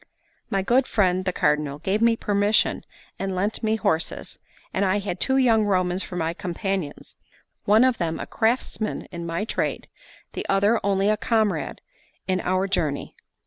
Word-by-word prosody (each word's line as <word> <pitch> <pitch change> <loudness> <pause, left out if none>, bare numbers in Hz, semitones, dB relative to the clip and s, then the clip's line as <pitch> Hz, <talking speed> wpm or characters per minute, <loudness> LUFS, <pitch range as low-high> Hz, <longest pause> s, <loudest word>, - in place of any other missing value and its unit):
My 195 -1 0
good 250 +6 +3
friend 185 -3 +1
the 185 - +1
Cardinal 150 -3 0
gave 190 +7 -1
me 230 0 +4
permission 205 0 +1 0.4
and 195 -1 -2
lent 200 +4 -1
me 220 -1 +1
horses; 170 -7 -1 0.3
and 195 - +1
I 195 +1 +2
had 195 -3 -4
two 265 0 +2
young 230 -4 +4
Romans 185 -2 +1
for 180 - -6
my 165 -1 -1
companions, 180 -2 -4 0.5
one 215 +4 +5
of 255 -2 +2
them 165 -2 -1
a - - -4
craftsman 225 -1 -1
in 170 -1 -6
my 165 +5 -2
trade, - - -2 0.5
the - - -4
other 200 +4 +3
only 195 0 +2
a 215 0 +3
comrade 220 -2 0 0.5
in 185 -1 +1
our 185 +1 +1
journey. 155 -7 -2
195 Hz, 165 wpm, -24 LUFS, 180-215 Hz, 0.5 s, one